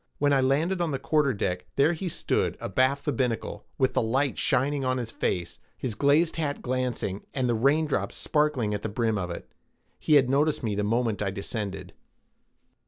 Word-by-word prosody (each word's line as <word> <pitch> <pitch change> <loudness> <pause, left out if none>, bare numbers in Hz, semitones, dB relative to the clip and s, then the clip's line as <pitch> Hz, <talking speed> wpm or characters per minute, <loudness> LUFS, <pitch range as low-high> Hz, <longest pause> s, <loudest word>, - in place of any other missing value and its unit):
When 145 0 +2
I 135 - +4
landed 155 +8 +1
on 170 - +1
the 140 - -1
quarterdeck, 135 - 0
there 145 +5 +4
he 175 +2 -3
stood - - -1
abaft 130 +7 +1
the 150 - +1
binnacle, 125 -3 -2
with 130 0 +2
the - - +2
light 130 +4 +1
shining 140 +2 +1
on 130 0 +1
his 120 -3 -4
face, 85 -2 -2 0.2
his 125 - -2
glazed 150 +7 +3
hat 145 -3 -2
glancing, 125 -6 -2
and 130 -2 +1
the 120 - +2
raindrops 135 -4 +1
sparkling 150 -8 0
at 105 - -2
the 110 - -3
brim 110 0 0
of 90 -2 -3
it. 85 - -7 0.5
He 155 - +3
had 135 -3 +6
noticed 145 +3 +1
me 110 -3 0
the 105 +1 -1
moment 115 0 0
I 100 - 0
descended. 100 0 -5
130 Hz, 185 wpm, -27 LUFS, 110-145 Hz, 0.5 s, had